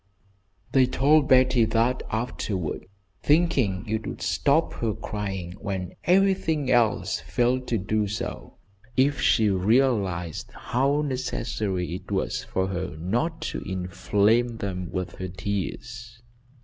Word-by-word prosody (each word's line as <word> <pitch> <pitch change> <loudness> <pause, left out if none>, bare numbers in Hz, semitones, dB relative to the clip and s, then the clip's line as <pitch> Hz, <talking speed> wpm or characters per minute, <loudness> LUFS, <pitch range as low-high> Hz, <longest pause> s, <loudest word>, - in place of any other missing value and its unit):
They 130 -2 +5
told 145 +3 +3
Betty 130 -2 +5
that 115 +3 +1
afterward, 105 -8 -3 0.3
thinking 135 - +2
it 110 0 -2
would - - -6
stop 140 - +2
her 110 -3 0
crying, 95 -4 -4
when 95 -3 -4
everything 180 -6 +2
else 120 -3 +2
failed 125 +1 0
to 115 - +1
do 105 +2 0
so, 105 +1 -5 0.4
if 140 +2 +3
she 110 -3 +4
realised 95 - +1
how 140 +4 0
necessary 115 - -2
it 90 - -7
was - - -1
for 95 0 -1
her 95 -3 -4
not 120 - -1
to - - -3
inflame 105 +5 +1
them 90 -4 -4
with 95 -1 -4
her 95 - -4
tears. 110 +5 -5
110 Hz, 125 wpm, -25 LUFS, 95-130 Hz, 0.4 s, They